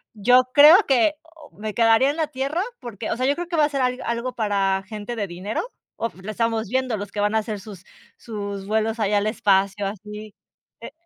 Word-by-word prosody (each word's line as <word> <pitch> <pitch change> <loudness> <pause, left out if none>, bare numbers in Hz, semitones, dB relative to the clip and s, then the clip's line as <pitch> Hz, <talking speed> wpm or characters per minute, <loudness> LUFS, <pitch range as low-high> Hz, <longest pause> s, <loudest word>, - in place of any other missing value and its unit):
yo 250 +5 +4
creo 310 +8 +9
que 270 +3 +3
o 325 -2 -18
me 215 0 -6
quedaría 230 +3 +4
en 290 - -2
la 320 - +1
Tierra, 280 +6 -2 0.2
porque, 220 -2 -6
o - - -1
sea, 255 +1 0
yo 285 - +2
creo 350 +2 -5
que 345 - -3
va 305 -2 +4
a - - -1
ser 275 -2 -2
a - - +3 0.2
algo 235 +2 -2
para 195 -4 0
gente 215 +2 -6
de 205 -3 -3
dinero 185 +5 -4 0.3
o 230 - -2
lo 215 - -5
estamos 225 -1 -1
viendo, 255 -2 -1
los 200 0 -7
que 205 - -5
van 210 +1 +1
a - - +4
hacer 215 -1 -3
sus 195 -2 -12 0.3
sus 200 -3 -6
vuelos 220 +2 -1
allá 205 -1 +2
al 205 - -1
espacio 200 -1 +1
así, 210 +1 -7 0.5
eh - - -9
220 Hz, 225 wpm, -23 LUFS, 205-255 Hz, 0.5 s, creo